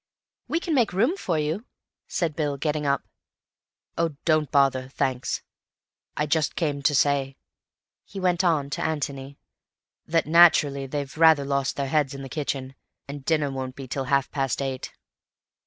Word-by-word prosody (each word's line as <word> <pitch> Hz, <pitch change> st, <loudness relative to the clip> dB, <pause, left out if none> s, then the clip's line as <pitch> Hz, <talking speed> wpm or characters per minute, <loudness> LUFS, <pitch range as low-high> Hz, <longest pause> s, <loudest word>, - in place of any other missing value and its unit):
"We 330 Hz, -, 0 dB
can 340 Hz, -2 st, -2 dB
make 240 Hz, -9 st, +2 dB
room 230 Hz, -, +2 dB
for 185 Hz, -, -2 dB
you," 155 Hz, -, -2 dB, 0.4 s
said 165 Hz, -4 st, -1 dB
Bill, 145 Hz, -3 st, -1 dB
getting 150 Hz, 0 st, -1 dB
up. 140 Hz, -1 st, +1 dB, 1.0 s
"Oh, 165 Hz, -3 st, 0 dB
don't 155 Hz, -2 st, +2 dB
bother, 135 Hz, -2 st, +2 dB
thanks. 130 Hz, -2 st, -2 dB, 0.7 s
I 150 Hz, -, +1 dB
just 150 Hz, 0 st, 0 dB
came 145 Hz, -4 st, -1 dB
to 145 Hz, +1 st, +2 dB
say," 135 Hz, -1 st, +1 dB, 0.7 s
he 195 Hz, -, -9 dB
went 180 Hz, -1 st, +1 dB
on 150 Hz, -5 st, +1 dB
to -, -, -2 dB
Antony, 140 Hz, -3 st, -3 dB, 0.7 s
"that 165 Hz, 0 st, +2 dB
naturally 155 Hz, -4 st, +5 dB
they've 140 Hz, 0 st, -4 dB
rather 160 Hz, -3 st, +5 dB
lost 140 Hz, -1 st, 0 dB
their 140 Hz, -, -1 dB
heads 145 Hz, -2 st, +1 dB
in 135 Hz, -, -7 dB
the 135 Hz, -, -8 dB
kitchen, 135 Hz, -2 st, -3 dB, 0.3 s
and 140 Hz, 0 st, -7 dB
dinner 150 Hz, -2 st, +1 dB
won't 130 Hz, -1 st, -5 dB
be 135 Hz, -1 st, -8 dB
till 135 Hz, +1 st, -3 dB
half 140 Hz, 0 st, +1 dB
past 135 Hz, -3 st, -1 dB
eight. 135 Hz, -2 st, -4 dB
145 Hz, 160 wpm, -25 LUFS, 135-160 Hz, 1.0 s, naturally